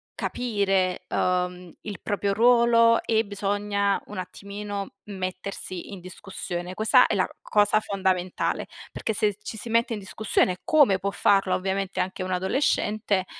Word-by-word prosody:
capire 195 -6 0
uhm 180 -1 -1
il 205 -2 -7
proprio 200 -1 -1
ruolo 230 0 +5
e 220 0 +2
bisogna 200 0 -1
un 210 - -8
attimino 200 +2 -6 0.2
mettersi 185 0 -5
in 190 - -7
discussione. 180 -1 -5
Questa 215 +3 +5
è - - -1
la - - +1
cosa 210 0 +3
fondamentale, 185 -3 -1 0.3
perché 220 - -3
se 210 -1 +1
ci 220 - -6
si 230 - -4
mette 230 +1 +2
in 210 - -4
discussione, 190 -2 0
come 285 -11 +4
può 200 +1 -2
farlo 195 -2 +3
ovviamente 195 +1 -2
anche 185 0 -2
un 185 - -4
adolescente, 205 0 0
200 Hz, 140 wpm, -25 LUFS, 185-215 Hz, 0.3 s, ruolo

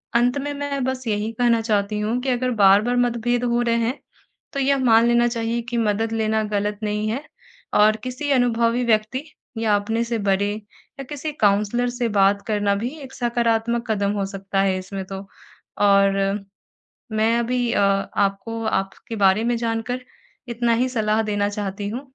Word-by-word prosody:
अंत 245 +3 +3
में 290 +1 -3
मैं 280 -1 -3
बस 260 -1 -3
यही 210 0 -1
कहना 235 -2 +3
चाहती 210 -1 0
हूँ 220 +4 -1
कि 265 - -2
अगर 255 0 0
बार-बार 205 +5 +5
मतभेद 240 0 +1
हो 240 0 +1
रहे 235 -1 +1
हैं 235 +4 -1 0.5
तो 275 - -2
यह 275 +1 +2
मान 225 -1 +5
लेना 240 0 +4
चाहिए 235 0 -2
कि 240 - -2
मदद 225 0 0
लेना 220 -1 +1
गलत 205 0 -1
नहीं 210 0 -1
है 260 +7 -3 0.6
और 215 +1 +5
किसी 255 +3 -4
अनुभवी 240 -2 +2
व्यक्ति 225 +4 +1 0.4
या 220 -2 +2
अपने 225 +3 -1
से 230 0 -2
बड़े 200 0 +1 0.5
या - - -4
किसी 295 +1 -4
काउंसलर 210 +4 +2
से 245 -1 -2
बात 200 -1 +3
करना 205 -2 +1
भी 225 +5 -2
एक 265 -1 -10
सकारात्मक 235 -1 0
कदम 200 -1 0
हो 195 - 0
सकता 195 0 -2
है 190 -1 +1
इसमें 190 +1 -6
तो। 195 +1 -8 0.6
और 200 -1 +4 1.0
मैं 220 +2 +2
अभी 240 0 0
अ - - +2 0.4
आपको 200 +3 -1
आपके 195 +2 -3
बारे 195 +1 +3
में 240 0 +1
जानकर 230 +2 -2 0.5
इतना 235 0 0
ही 255 - +1
सलाह 220 -3 +1
देना 205 -1 0
चाहती 200 -1 -4
हूँ 230 +5 -4
225 Hz, 175 wpm, -22 LUFS, 205-240 Hz, 1.0 s, बार-बार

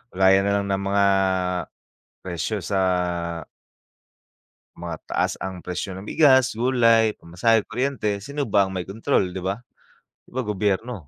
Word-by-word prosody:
Gaya 95 0 +5
nalang 100 0 +1
ng 95 0 0
mga, 100 0 +2 1.2
presyo 90 +5 -2
sa 95 +3 -1 2.0
mataas 85 -2 -3
ang 95 -2 -6
presyo 90 +1 -4
ng 95 - -8
bigas, 130 +1 +4
gulay, 115 -3 +3
pamasahe, 105 +6 +1
kuryente, 120 -5 -2
sino 140 +8 -4
ba 100 -5 +2
ang 95 - -7
may 90 - -2
kontrol 110 +7 0
'di 95 - -6
ba, 95 +6 -3 0.6
'di - - -21
ba, 130 - -1
gobyerno? 105 +2 -1
100 Hz, 130 wpm, -23 LUFS, 95-115 Hz, 2.0 s, Gaya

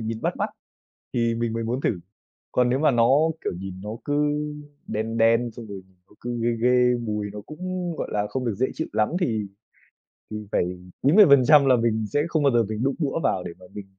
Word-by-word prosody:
nhìn 110 0 -4
bắt - - -1
mắt - - -2 0.6
thì 115 -1 +1
mình 115 -1 -2
mới 115 - -2
muốn 120 +4 -2
thử. 95 - 0 0.5
Còn 125 -1 +2
nếu 130 +2 +1
mà 155 -1 +4
nó, 115 -2 +3 0.3
kiểu, - - -2
nhìn 95 -1 -7
nó 105 - -6 0.2
cứ 145 - -1 0.7
đen 110 +2 -3
đen, 115 +1 +3
xong 115 0 -10
rồi 100 -2 -7 0.3
nó - - -22
cứ 120 0 -4
ghê 120 - +2
ghê, 125 0 +4
mùi 105 -3 -3
nó 105 - -7
cũng, 180 +2 -4
gọi - - -3
là, 105 0 -1
không 130 +3 -3
được 115 -4 -1
dễ 130 +6 +1
chịu 160 - -4
lắm, 105 - +2
thì 110 - -1 0.8
thì 105 - -4
phải - - +2 0.4
90% 145 - +7
là 130 -2 +5
mình 115 -2 0
sẽ 145 - +2
không 160 -3 0
bao 140 - +4
giờ 120 -1 +3
mình 110 +2 -3
đụng 135 0 0
đũa 150 0 -1
vào 90 - +1
để - - -6
mà - - -14
mình 100 -1 -7
120 Hz, 220 wpm, -24 LUFS, 110-135 Hz, 0.8 s, 90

